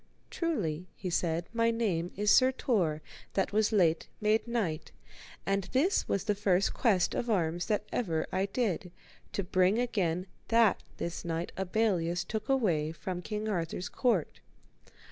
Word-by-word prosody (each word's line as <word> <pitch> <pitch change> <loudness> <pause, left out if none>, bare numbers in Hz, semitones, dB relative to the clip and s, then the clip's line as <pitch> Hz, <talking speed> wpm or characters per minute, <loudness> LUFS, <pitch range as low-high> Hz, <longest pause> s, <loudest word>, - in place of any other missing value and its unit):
Truly, 185 - -2
he 185 - -5
said, 170 0 0
my 230 0 +3
name 195 -7 0
is 210 +1 +2
Sir 260 0 +6
Tor 180 - 0 0.3
that 195 +1 0
was 215 +1 +3
late 170 -6 +3
made 215 +2 +2
knight, 205 -10 -2 0.5
and 195 -1 0
this 315 +10 +2
was 195 - 0
the 210 0 +1
first 200 -2 +2
quest 205 -8 +2
of 240 - -2
arms 175 -4 0
that 210 0 0
ever 165 -9 0
I 190 +1 0
did, 195 -5 -1 0.4
to 200 - -1
bring 185 +2 +3
again 185 -8 0 0.2
that 230 -3 +4 0.2
this 170 - -4
knight 165 0 -3
Abelleus 180 -3 0
took 220 +1 -4
away 175 - +2
from 180 +2 -5
King 210 +3 -4
Arthur's 180 -2 -2
court. 225 - 0
195 Hz, 150 wpm, -30 LUFS, 175-220 Hz, 0.5 s, Sir